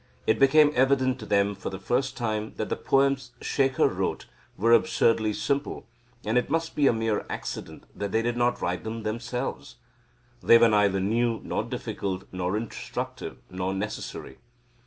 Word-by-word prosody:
It 110 - +2
became 145 +2 +6
evident 130 -1 +2
to 110 - -8
them 100 0 +2
for - - -6
the 95 - -6
first 125 +7 -1
time 110 -3 -2
that 110 - -3
the - - 0
poems 135 -2 +1
Shekhar 135 -2 +2
wrote - - -2 0.3
were 115 +3 +4
absurdly 115 -2 +3
simple, 140 +6 -2 0.4
and 110 +4 +3
it 125 - -4
must 165 +1 -1
be 145 -2 +4
a - - +6
mere 110 -2 -1
accident - - -6
that 100 -1 -4
they 110 +2 +1
did 120 0 0
not 120 0 +1
write 90 0 -1
them 110 0 -5
themselves. 120 +4 -4 0.7
They 115 - +7
were 115 0 +5
neither 100 -2 +3
new, 115 +4 +1
nor - - -2
difficult, 95 -1 -4
nor 90 +2 -1
instructive, 115 +1 -5
nor 95 +1 -2
necessary. 105 +2 -5
115 Hz, 165 wpm, -26 LUFS, 105-130 Hz, 0.7 s, They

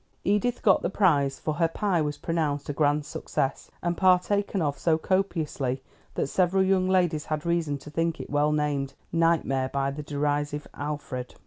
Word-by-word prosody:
Edith 210 +5 +1
got 195 - +5
the - - -1
prize, 145 -9 +2
for 155 - -2
her 165 +2 +2
pie 175 +1 0
was 145 -1 -2
pronounced 150 -4 -1
a - - -1
grand 145 0 +1
success, 140 -2 -3
and 175 0 0
partaken 190 +2 +2
of 145 -4 -1
so 160 -2 +2
copiously 155 -8 -1 0.3
that - - 0
several 185 +5 +2
young 190 -1 +2
ladies 175 -5 +2
had 155 0 -3
reason 170 -4 0
to 150 +2 -12
think 165 +1 -1
it - - -7
well 145 +1 +2
named 145 -2 -1 0.2
"Nightmare" 165 -6 +2
by 140 0 -1
the 145 +2 -6
derisive 145 0 -1
Alfred. 145 -4 -5
150 Hz, 175 wpm, -27 LUFS, 145-175 Hz, 0.3 s, got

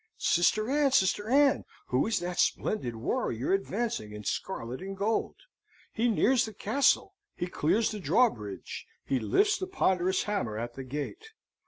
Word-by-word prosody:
Sister 215 +5 +2
Ann, 280 +1 +2
Sister 205 -1 +2
Ann, 275 +1 +4 0.3
who 125 +8 +2
is 225 -2 +1
that 175 +1 -4
splendid 125 - 0
warrior 115 +5 -1
advancing 195 - -2
in 105 0 -8
scarlet 125 - -4
and 195 +1 -6
gold? 215 +3 0 0.6
He 235 +2 +1
nears 245 +3 +3
the 220 -2 -9
castle, 265 +9 +2 0.2
he - - -2
clears 180 +6 +1
the 215 - -5
drawbridge, 145 - 0 0.2
he 135 - 0
lifts 410 - +2
the 375 - -3
ponderous 190 - +1
hammer 195 - -2
at 120 +1 -4
the 135 - -7
gate. 150 - -6
195 Hz, 155 wpm, -29 LUFS, -, 0.6 s, Ann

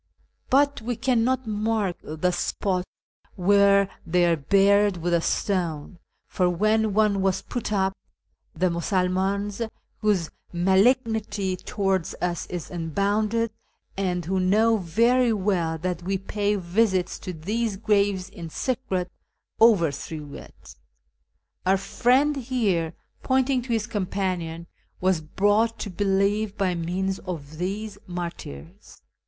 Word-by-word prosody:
But 280 0 +3
we 240 +2 -2
cannot 255 +1 +1
mark 215 -3 0
the 160 +4 -1
spot 180 +1 -1 0.5
where 200 +1 +4 0.2
they 175 +1 +2
are 170 -1 +3
buried 200 +5 +3
with 175 +1 -1
a 170 - +3
stone, 175 -3 -2 0.3
for 180 -1 +1
when 215 +3 +1
one 210 -2 +3
was 190 -1 0
put 240 -3 -4
up, 190 -2 +1 0.6
the 180 +2 +1
Musulmans, 190 +4 0 0.4
whose 200 -6 +1 0.2
malignity 200 +1 +2
towards 190 -1 -1
us 175 -1 -2
is 175 -3 -6
unbounded, 205 +7 0 0.4
and 180 -3 -1
who 190 +2 0
know 215 +5 +3
very 230 +7 +3
well 185 -6 0
that 180 +1 -3
we 190 +2 -1
pay 205 +2 -1
visits 190 0 0
to 185 - -6
these 205 +6 -2
graves 200 -3 +1
in 175 -4 -9
secret, 190 - -2 0.5
overthrew 160 -8 +2
it. - - -12 0.9
Our 190 +1 +3
friend 255 +9 +2
liere 190 -10 +1 0.2
" - - -43
(pointing 260 0 +2
to 245 - -11
his 225 -2 +1
companion) 180 -5 -3 0.2
" - - -42
was 185 -3 +1
brought 205 +8 +1
to 205 - -5
believe 200 +2 +1
by 190 -3 +1
means 185 +3 -2
of 155 -4 -7
these 205 +3 -4
martyrs. 100 - -8
195 Hz, 125 wpm, -25 LUFS, 175-215 Hz, 0.9 s, where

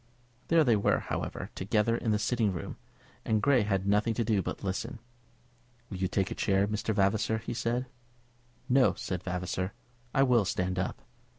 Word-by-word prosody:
There 165 -1 +5
they 120 -6 +4
were, 100 - +2
however, - - -4
together 105 +3 +1
in 115 - -2
the 105 - +3
sitting 110 -1 +1
room, 85 -3 -6 0.5
and 110 -1 +1
Grey 130 +1 +4
had 100 -2 0
nothing 105 +3 +2
to 115 - +1
do 110 -3 +1
but - - -4
to - - -9
listen. 110 +6 -3 0.9
"Will 95 - -4
you 95 0 0
take 95 +1 -1
a - - 0
chair, 100 0 +1
Mr. 105 +1 -2
Vavasor?" 110 +2 +2
he 110 - -5
said. 120 +2 -1 0.8
"No," 130 0 +4
said 90 -2 -4
Vavasor; 90 +1 -3 0.4
"I 135 - +3
will 125 -4 +4
stand 90 0 -1
up." 95 - -3
105 Hz, 180 wpm, -30 LUFS, 95-115 Hz, 0.9 s, There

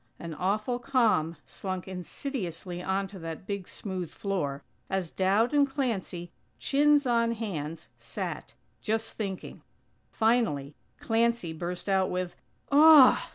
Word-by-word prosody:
An 170 -1 -6
awful 210 +8 -1
calm 225 - +2
slunk 185 -1 -5
insidiously 180 - -5
onto 195 +1 -2
that 165 +1 -7
big 200 -2 -4
smooth 185 -5 -5
floor, 145 -9 -3 0.3
as 190 -4 -2
Dowd 200 +8 +2
and 285 -1 +4
Clancy, 200 - -3 0.3
chins 290 0 +3
on 230 -1 +2
hands, 165 -8 -5
sat, - - -6 0.3
just 225 +1 -1
thinking! 195 -4 -5 0.5
Finally 220 - +1 0.3
Clancy 230 -6 +1
burst 175 +3 -5
out 190 -1 +2
with: 180 -1 -3 0.4
"Aw! 295 -2 +8
195 Hz, 115 wpm, -28 LUFS, 175-235 Hz, 0.5 s, Aw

